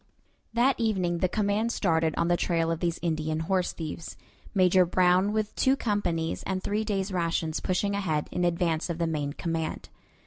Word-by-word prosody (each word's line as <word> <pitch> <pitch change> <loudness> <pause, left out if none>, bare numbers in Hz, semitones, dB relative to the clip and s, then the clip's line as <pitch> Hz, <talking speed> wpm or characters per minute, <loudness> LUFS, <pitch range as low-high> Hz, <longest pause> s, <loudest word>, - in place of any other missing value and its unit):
That 245 +3 +3
evening 185 -7 0
the 185 - +1
command 210 +3 0
started 160 -7 +1
on 170 - +1
the 175 - +3
trail 165 -2 0
of 165 - -2
these 170 -1 -1
Indian 155 -1 -1
horse 180 +2 0
thieves, 160 0 -7 0.3
Major 185 -2 +5
Brown 180 +2 +3
with 215 0 -1
two 265 +1 +3
companies 180 -9 -1
and 190 -1 -3
three 210 +2 0
days' 200 -2 -2
rations 165 -3 -1
pushing 200 +2 0
ahead 165 -7 -1
in 180 - -1
advance 170 -1 0
of 170 - -2
the 170 - 0
main 150 -3 -2
command. 165 0 -3
175 Hz, 175 wpm, -27 LUFS, 165-200 Hz, 0.3 s, Major